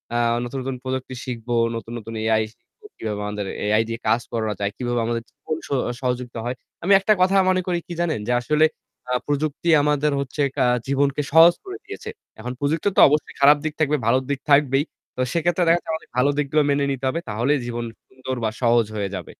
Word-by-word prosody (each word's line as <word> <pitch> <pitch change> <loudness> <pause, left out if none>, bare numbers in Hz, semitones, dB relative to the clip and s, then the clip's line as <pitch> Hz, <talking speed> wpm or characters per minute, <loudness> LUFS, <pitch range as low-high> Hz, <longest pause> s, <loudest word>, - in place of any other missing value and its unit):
আ - - +2 0.3
নতুন, 125 +2 -4
নতুন 135 0 -3
প্রযুক্তি 130 0 -4
শিখবো, 120 -1 -3 0.2
নতু্‌ন, 115 +1 -6
নতুন 115 +1 -9
এআই 110 0 +2
শিখব 450 - -50 0.2
কিভাবে 105 -2 -4
আমাদের 105 -1 -4 0.2
এআই 110 +2 +3
দিয়ে 115 0 -4
কাজ 115 +2 +3
করানো 110 -2 -1
যায়, 100 0 -1
কিভাবে 120 -1 -1
আমাদের 115 0 -2
জীবন 155 - -5
স - - -19 0.3
সহযোগিতা 125 -2 -3
হয়। 125 - -2 0.3
আমি 185 - +1
একটা 205 +2 +3
কথা 190 +2 +4
মনে 185 0 +2
করি 175 -1 0
কি 175 - -6
জানেন? 160 -9 0
যে 125 - 0
আসলে 150 +5 +3 0.4
আ - - -2 0.2
প্রযুক্তি 145 +3 -1
আমাদের 150 0 +2
হচ্ছে 140 +2 -3
কা - - +2 0.2
জীবনকে 140 +1 +1
সহজ 165 +2 +8
করে 385 +1 -7
দিয়েছে। 430 +2 -8 0.3
এখন 125 +3 -5
প্রযুক্তি 150 +6 0
তো - - +8
অবশ্যই 150 +1 0
খারাপ 145 +2 +7
দিক 155 - -1
থাকবে, 150 -1 +2
ভালো 130 +3 +4
দিক 140 -1 -1
থাকবেই। 140 -1 +4 0.3
তো - - -2
সেক্ষেত্রে 175 +1 +1
দেখা 165 - +5
যাচ্ছে 165 - -14
আমাদের 160 - -6
ভালো 125 +3 +4
দিকগুলো 150 +1 +2
মেনে 140 0 +2
নিতে 135 -1 -3
হবে। 165 - -2
তাহলেই 125 +7 +1
জীবন 120 0 -4 0.2
সুন্দর 130 0 -6
বা 110 - +2
সহজ 120 -1 +4
হয়ে 100 -2 -2
যাবে। 90 - -5
135 Hz, 205 wpm, -22 LUFS, 120-150 Hz, 0.4 s, সহজ